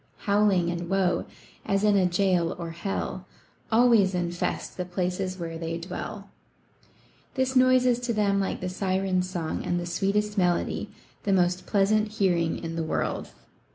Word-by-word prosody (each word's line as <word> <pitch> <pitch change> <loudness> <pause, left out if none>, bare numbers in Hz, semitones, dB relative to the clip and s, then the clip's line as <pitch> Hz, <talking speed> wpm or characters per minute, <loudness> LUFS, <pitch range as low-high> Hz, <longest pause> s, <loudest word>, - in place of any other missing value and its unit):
Howling 200 -4 +3
and 170 0 -4
woe, 190 -2 +1 0.4
as 195 +1 0
in 210 -1 +4
a 190 -2 +4
jail 180 -2 +1
or 170 -1 -5
hell, 185 +1 -4 0.4
Always 225 -5 +5
infest 175 -1 -2
the 180 - -2
places 180 +1 -2
where 165 -2 -5
they 165 0 -3
dwell. 195 +4 -7 1.0
This 260 0 0
noise 255 0 +5
is 245 -1 +3
to 245 -1 -2
them 200 -2 +2
like 195 - -2
the 185 - -2
Sirens' 185 0 0
song 170 -4 -3
and 175 - -1
the 175 - -4
sweet 195 +3 -1
est 210 0 0
melody, 175 -1 0 0.3
the 200 - 0
most 180 0 +1
pleasant 215 +1 +2
hearing 175 -6 +1
in 165 -1 -5
the 165 - -1
world. 160 - -2
185 Hz, 160 wpm, -26 LUFS, 175-205 Hz, 1.0 s, Always